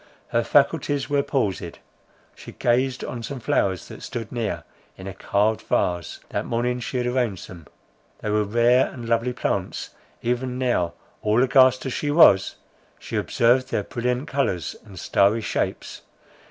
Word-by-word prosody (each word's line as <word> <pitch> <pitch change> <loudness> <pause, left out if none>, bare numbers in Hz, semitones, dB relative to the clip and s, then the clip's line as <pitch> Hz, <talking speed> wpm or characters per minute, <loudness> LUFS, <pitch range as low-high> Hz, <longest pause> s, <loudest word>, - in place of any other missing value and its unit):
Her 115 - +1
faculties 145 +1 +2
were 145 -1 +3
palsied. 105 - -2 0.6
She - - -12
gazed 130 +2 +1
on 120 - -5
some 130 +3 -5
flowers 95 -5 0
that - - -10
stood 115 -3 -6
near 115 -4 -3 0.3
in 95 - -10
a 95 - -5
carved 105 +3 0
vase: 90 -1 -1
that - - -2
morning 125 +1 -1
she 125 +2 -4
had 125 - 0
arranged 125 -6 -1
them, 85 -4 -12 0.5
they 105 - -4
were 105 0 +2
rare 120 +4 +3
and 120 -3 -8
lovely 115 +2 +1
plants; 125 - -3 0.3
even 125 +1 -1
now 120 -10 0 0.3
all 110 +4 +3
aghast 130 0 +4
as 130 - -2
she 145 - -2
was, 145 - +6 0.4
she - - -7
observed 125 +2 +2
their - - -1
brilliant 125 +3 -2
colours 135 - -1
and 95 -4 -11
starry 100 +6 +3
shapes. 110 - -3
120 Hz, 155 wpm, -24 LUFS, 105-130 Hz, 0.6 s, was